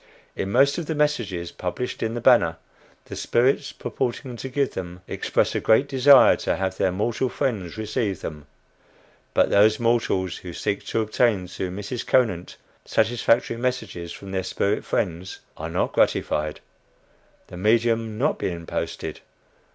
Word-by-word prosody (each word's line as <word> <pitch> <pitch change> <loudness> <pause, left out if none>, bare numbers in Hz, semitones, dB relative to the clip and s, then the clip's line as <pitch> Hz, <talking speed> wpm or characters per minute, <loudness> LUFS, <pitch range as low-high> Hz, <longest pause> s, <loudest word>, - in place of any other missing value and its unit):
In 95 - -3
most 140 +8 +4
of 165 - -5
the 160 - -2
"messages" 120 -13 -1
published 110 +8 -4
in 115 +1 -1
the 120 - -3
Banner, 115 -10 +4 0.5
the - - -8
spirits 125 +3 +1
purporting 125 0 -4
to 130 - -6
give 140 +1 0
them, 90 -1 -6
express - - 0
a - - 0
great 110 +6 +3
desire 140 +1 +7
to - - -1
have 95 0 -2
their 95 - +2
mortal 115 +7 -1
friends 105 -12 -2
receive 110 -3 -2
them; 75 -2 -7 0.9
but - - +3
those 105 +2 +5
mortals 115 -6 +1
who 90 -2 -9
seek 100 +3 -2
to 115 - 0
obtain 110 -3 +1
through 95 +1 -4
Mrs. 105 +6 -5
Conant 110 -9 +1 0.3
satisfactory 115 +1 +1
messages 110 -9 -3
from 100 +1 -9
their 95 -1 -1
spirit 100 +2 -1
friends, 90 0 -2 0.2
are - - -6
not - - -1
gratified 75 0 +1 0.8
the 90 - -11
medium 115 +2 +1
not 145 +7 0
being 85 -2 -3
posted. - - -4
110 Hz, 150 wpm, -24 LUFS, 95-120 Hz, 0.9 s, desire